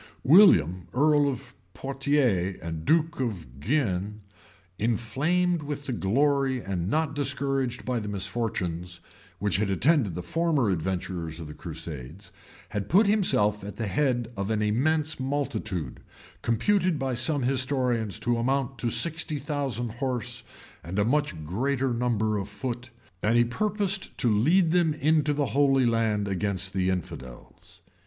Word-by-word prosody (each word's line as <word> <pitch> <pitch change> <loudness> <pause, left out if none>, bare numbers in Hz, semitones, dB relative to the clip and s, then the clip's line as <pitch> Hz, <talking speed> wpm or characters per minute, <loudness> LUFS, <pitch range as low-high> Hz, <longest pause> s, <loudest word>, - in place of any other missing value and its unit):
William 95 - +6
earl 145 +1 +4
of 130 - -6 0.2
Poitiers 135 -9 0
and 80 -1 -5
duke 160 -2 +2
of 90 - -4
Guienne, 105 - -1 0.6
inflamed 150 - +1
with 145 -1 -5
the 130 - -2
glory 135 +5 +1
and 95 -4 -3
not 155 +2 0
discouraged 135 -3 -1
by 125 -2 0
the 105 - -6
misfortunes, 95 -4 -3 0.4
which 100 0 0
had 105 0 0
attended 110 - +2
the 90 - -4
former 150 - +1
adventurers 85 -2 -3
in 80 - -6
the 75 - -8
crusades, 80 +1 -7 0.4
had 105 -2 -4
put 200 +6 +5
himself 105 - +2
at 100 - -7
the 115 - -3
head 120 +2 0
of 100 +1 -3
an 110 -1 +1
immense 150 +9 +1
multitude, 130 - -3 0.4
computed 175 - +2
by 135 -2 -2
some 130 +4 0
historians 125 -5 0
to 120 +2 0
amount 135 +2 -1
to 120 - 0
sixty 160 +3 -1
thousand 135 -5 -2
horse, 125 -1 -3 0.4
and 85 +5 -5
a 100 - +3
much 115 - 0
greater 130 - 0
number 110 -3 0
of 100 +1 -5
foot,[] 120 +3 -5 0.3
and 115 +3 +3
he 120 - +5
purposed 200 - -1
to 115 -4 +2
lead 160 - +4
them 170 -3 +2
into 155 0 +2
the 145 0 0
Holy 135 -2 +4
Land 110 -3 +1
against 95 -1 -2
the 95 -1 +1
infidels. 65 -9 -7
120 Hz, 145 wpm, -27 LUFS, 100-145 Hz, 0.6 s, William